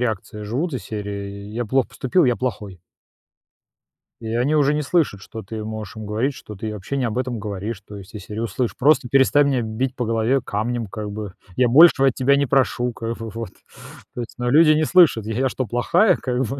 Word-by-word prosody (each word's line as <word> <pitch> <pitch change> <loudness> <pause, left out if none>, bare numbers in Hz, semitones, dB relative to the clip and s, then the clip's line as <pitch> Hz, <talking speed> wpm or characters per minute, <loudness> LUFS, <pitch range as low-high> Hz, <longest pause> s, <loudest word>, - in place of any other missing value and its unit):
реакцией 110 -2 -3
живут 135 +11 -2
из 125 -8 -5
серии: 100 -1 -6
"Я 120 +1 -3
плохо 130 +3 +1
поступил, 150 +6 +1
я 125 - +3
плохой". 105 -8 -5 1.4
И 115 - -6
они 130 +6 +1
уже 145 -1 +3
не 150 - 0
слышат, 145 - 0
что 110 +2 -8
ты 110 +2 -7
можешь 110 -1 -6
им 110 -1 -7
говорить, 110 +7 -1
что 105 - -10
ты 110 +3 -5
вообще 105 +7 -5
не 130 - 0
об 115 0 -3
этом 125 -2 -2
говоришь, 105 0 -5
то 105 +1 -11
есть 100 0 -12
из 105 -3 -8
серии: 105 +1 -6
"Услышь. 115 +2 -2
Просто 140 -2 +3
перестань 140 +2 +4
меня 130 -3 +1
бить 120 +4 -3
по 125 - -2
голове 115 +4 +1
камнем, 115 +2 -3
как 105 +1 -6
бы, 105 -2 -6 0.2
я 125 - +3
большего 135 +1 +7
от 135 - +2
тебя 135 +3 +3
не 140 0 +2
прошу, 125 -2 +1
как 115 0 -5
бы, 115 0 -6
вот". 115 -1 -6 0.6
То 125 - -5
есть, 115 - -8
но 125 0 -1
люди 155 +3 +6
не 155 +1 +3
слышат: 160 - +4
"Я 110 - -3
я 130 +2 +1
что, 130 - -3
плохая, 120 - +3
как 125 0 -2
бы?" 135 +5 -5
120 Hz, 220 wpm, -21 LUFS, 105-135 Hz, 1.4 s, большего